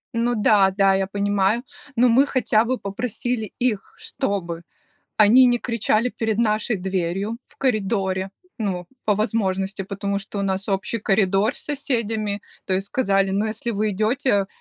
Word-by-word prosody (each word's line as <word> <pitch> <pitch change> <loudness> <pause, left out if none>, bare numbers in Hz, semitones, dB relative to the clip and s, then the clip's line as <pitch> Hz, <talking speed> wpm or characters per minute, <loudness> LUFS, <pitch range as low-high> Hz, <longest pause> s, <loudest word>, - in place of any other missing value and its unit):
Ну 240 +1 +1
да-да, 195 -2 +4
я 190 0 0
понимаю, 205 +3 +1 0.3
но 245 +2 +5
мы 255 +4 +4
хотя 230 -4 +2
бы 255 +2 0
попросили 220 +1 -3
их, 235 -5 -1
чтобы 170 -4 -3 0.6
они 225 +5 +7
не 245 -1 +3
кричали 230 0 0
перед 225 -3 -2
нашей 215 -1 +1
дверью 190 +4 -2
в - - -22
коридоре, 195 -6 0 0.3
ну, 185 -5 -2 0.2
по 210 - +3
возможности, 195 -2 -1
потому 200 +1 -3
что 200 +1 -6
у - - -1
нас 195 +1 -2
общий 195 +4 -1
коридор 200 +3 +2
с - - -7
соседями. 225 -8 -2 0.2
То 185 - 0
есть 195 +1 -1
сказали: 195 -6 +1
"Ну, 205 +3 0
если 220 +2 -3
вы 215 -1 0
идете 215 0 +1
210 Hz, 150 wpm, -22 LUFS, 195-230 Hz, 0.6 s, они